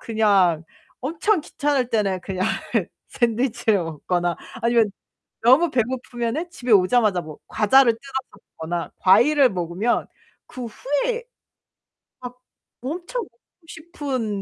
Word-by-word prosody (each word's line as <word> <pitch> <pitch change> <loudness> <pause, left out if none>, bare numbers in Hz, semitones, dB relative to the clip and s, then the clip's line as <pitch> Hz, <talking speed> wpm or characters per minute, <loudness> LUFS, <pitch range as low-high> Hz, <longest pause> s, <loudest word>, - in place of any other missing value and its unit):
그냥 195 -7 +2 0.4
엄청 330 +7 0
귀찮을 285 -5 -1
때는 195 -4 0
그냥 190 -1 -2 0.6
샌드위치를 235 -2 +1
먹거나 175 +2 -2 0.3
아니면 230 -3 +3 0.5
너무 265 +9 +5
배고프면은 250 +5 -2
집에 245 -7 -2
오자마자 200 0 +4
뭐 155 -3 -10
과자를 235 +3 +4
뜯어서 265 +4 -5 0.4
먹거나 170 +1 -4
과일을 260 +7 +5
먹으면 180 +6 -1 0.4
그 250 -2 -7
후에 290 - -2 1.0
막 250 0 -9 0.4
엄청 350 - -4
먹고 325 - -22
싶은 270 - -4
240 Hz, 255 characters per minute, -22 LUFS, 195-275 Hz, 1.0 s, 너무